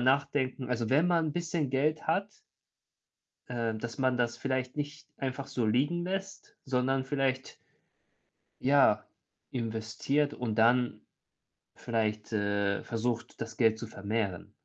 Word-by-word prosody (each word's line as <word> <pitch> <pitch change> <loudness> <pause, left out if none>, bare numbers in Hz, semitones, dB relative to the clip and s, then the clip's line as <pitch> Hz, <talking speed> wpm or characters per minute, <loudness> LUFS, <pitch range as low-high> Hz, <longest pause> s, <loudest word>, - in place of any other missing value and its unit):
nachdenken. 130 0 +1
Also, 115 -2 0
wenn 150 +6 +5
man 170 -2 +3
'n - - -3
bisschen 165 -5 -1
Geld 150 +4 +1
hat 195 +6 +1 1.2
äh, 115 -2 -1
dass 115 +1 -5
man 130 -1 +2
das 120 -1 0
vielleicht 130 0 -2
nicht 145 +1 -4
einfach 135 0 -3
so 120 - -1
liegen 145 +10 +2
lässt, 195 +2 -4
sondern 130 +1 +1
vielleicht 135 -1 -1 1.0
ja, 135 -6 +5 0.5
investiert 120 +5 0
und 120 -3 -2
dann 120 +2 +3 0.8
vielleicht, 110 -2 -1
äh, 100 -1 +1
versucht, 115 0 -2
das 115 -1 -5
Geld 110 -2 +4
zu 115 - -5
vermehren. 100 -3 -2
125 Hz, 125 wpm, -31 LUFS, 115-140 Hz, 1.2 s, wenn